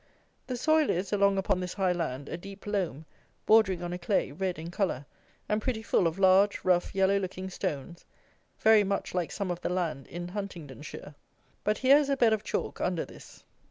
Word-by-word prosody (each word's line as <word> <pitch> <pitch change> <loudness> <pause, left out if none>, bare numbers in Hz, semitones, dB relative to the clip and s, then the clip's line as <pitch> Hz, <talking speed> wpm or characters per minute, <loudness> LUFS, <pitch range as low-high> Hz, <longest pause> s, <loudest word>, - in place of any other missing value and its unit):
The 250 -2 -3
soil 310 +3 +3
is, 185 +4 -1
along 200 -1 +3
upon 190 -1 +1
this 180 -1 -4
high 190 -2 +2
land, 145 -6 -3
a - - -4
deep 195 +3 -10
loam, 185 -8 -2 0.4
bordering 195 -5 +4
on 175 0 -3
a 180 - -4
clay, 180 -5 0
red 185 +3 -2
in 165 +2 -7
colour, 175 -8 -1 0.4
and 210 +1 0
pretty 220 -2 -2
full 185 - +2
of 165 +2 -3
large, 195 +1 +4
rough, 180 0 +2
yellow 195 +1 +3
looking 190 0 -5
stones, 165 +1 -4 0.5
very 220 -1 +6
much 200 0 -2
like 180 -3 -1
some 195 -3 -3
of 175 - -4
the - - -2
land 165 -7 -2
in 175 +1 -6
Huntingdonshire; 160 -7 -7 0.5
but 210 +1 +1
here 265 +2 +6
is 290 -2 +1
a 275 - +1
bed 230 -3 +4
of 215 - 0
chalk - - -3
under 180 -2 0
this. - - -14
190 Hz, 195 wpm, -29 LUFS, 175-205 Hz, 0.5 s, very